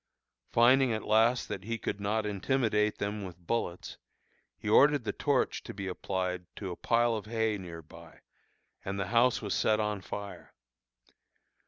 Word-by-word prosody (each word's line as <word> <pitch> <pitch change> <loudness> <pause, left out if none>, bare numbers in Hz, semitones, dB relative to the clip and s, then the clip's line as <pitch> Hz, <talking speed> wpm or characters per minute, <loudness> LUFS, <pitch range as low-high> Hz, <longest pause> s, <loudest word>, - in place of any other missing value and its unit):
Finding 125 +2 +5
at 110 -1 -3
last 115 +3 +3
that 95 - -5
he 115 +1 -2
could 105 - -4
not 105 +2 0
intimidate 105 0 +1
them 105 0 -3
with 90 -3 -8
bullets, 90 -1 -3 0.6
he - - -8
ordered 145 +5 +5
the 110 - -1
torch - - 0
to - - -9
be 100 -1 -5
applied 90 -1 -3
to 95 -3 -5
a - - -5
pile 120 +3 +2
of 105 -2 -4
hay 110 -1 0
near 85 -3 -8
by, 85 +1 -15 0.6
and 100 +1 -4
the 100 - -2
house 120 0 +3
was 100 - -2
set 110 0 +2
on 105 -2 -1
fire. 100 +1 -8
105 Hz, 165 wpm, -30 LUFS, 95-115 Hz, 0.6 s, Finding